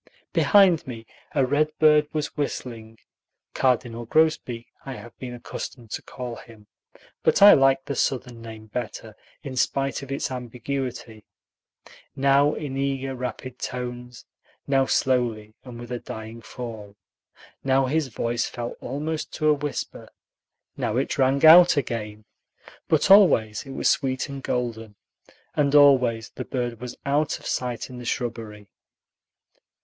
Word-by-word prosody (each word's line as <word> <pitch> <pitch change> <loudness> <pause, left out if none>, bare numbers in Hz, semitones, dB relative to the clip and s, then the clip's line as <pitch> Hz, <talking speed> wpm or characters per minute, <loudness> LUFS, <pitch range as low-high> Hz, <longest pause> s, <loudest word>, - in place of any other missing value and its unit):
Behind 190 -8 +4
me 115 -3 -7 0.3
a 135 -3 +3
redbird 150 +2 +3
was 150 -1 -3
whistling 115 -6 -5 0.6
(cardinal 120 -2 0
grosbeak, 130 -6 +1 0.2
I 135 - -6
have 120 -2 -12
been 125 -1 -6
accustomed 120 -1 -8
to - - -4
call 125 -2 -7
him, 110 -2 -15 0.6
but - - +3
I 205 - +11
like 135 -1 +3
the 140 - -3
Southern 125 -3 -2
name 110 -1 -10
better, 110 -1 -6 0.3
in 135 -3 -6
spite 135 +2 0
of 135 -1 -9
its 135 - -2
ambiguity), 125 -2 -5 0.9
now 140 +2 +3
in 140 -3 -5
eager, 135 -1 -2
rapid 125 0 -6
tones, 125 -1 -6 0.4
now 135 -1 +2
slowly 115 -5 0
and 125 -2 -10
with 120 0 -9
a 120 - -3
dying 110 +1 -8
fall. 110 -3 -8 0.7
Now 135 0 +3
his 150 +2 0
voice 120 0 -2
fell 120 0 -5
almost 150 +4 -4
to 155 - +1
a - - +6
whisper, 145 0 -5 0.7
now 110 - -2
it 135 - -1
rang 135 +3 +3
out 170 +1 +9
again; 110 -5 -3 0.6
but 160 +4 +2
always 140 - +5
it 135 - -7
was - - 0
sweet 130 0 0
and 140 -1 -6
golden, 115 -4 -3 0.6
and 145 -1 +1
always 125 -6 +5
the - - -7
bird 120 -3 -3
was 125 -1 -6
out 145 +2 +1
of - - -16
sight 125 -2 -3
in 125 - -8
the 120 - -9
shrubbery. 110 -4 -4
125 Hz, 140 wpm, -24 LUFS, 115-140 Hz, 0.9 s, I